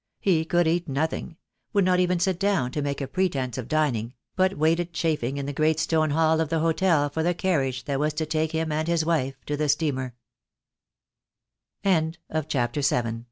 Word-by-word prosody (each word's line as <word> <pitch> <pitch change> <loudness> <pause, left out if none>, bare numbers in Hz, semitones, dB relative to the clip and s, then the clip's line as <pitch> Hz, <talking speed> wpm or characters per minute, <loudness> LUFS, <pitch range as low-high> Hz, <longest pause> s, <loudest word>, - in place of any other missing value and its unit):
He 165 -5 +2
could 175 0 +2
eat 175 +2 0
nothing; 160 +3 -2 0.4
would 200 -3 +3
not 180 0 +3
even 180 -1 +2
sit 180 0 0
down 195 -11 +1
to 150 - -2
make 140 0 -2
a 135 - -2
pretence 135 -7 -1
of 125 - -6
dining: 130 -6 0 0.2
but 190 +1 +2
waited 165 +3 +1
chafing 150 -6 -1
in 140 - -3
the 145 - -4
great 155 +2 +2
stone 155 -1 +1
hall 160 +1 +2
of 160 - -1
the 165 - 0
hotel 165 -1 +2
for 145 +3 -3
the 175 +2 +1
carriage 135 -10 0
that 140 -1 -2
was 150 +1 0
to 160 0 -1
take 155 0 -1
him 160 -1 -1
and 155 +1 -1
his 170 -2 +1
wife 135 -5 0
to 150 - -2
the 150 0 -1
steame 140 -4 0
160 Hz, 180 wpm, -25 LUFS, 145-170 Hz, 0.4 s, would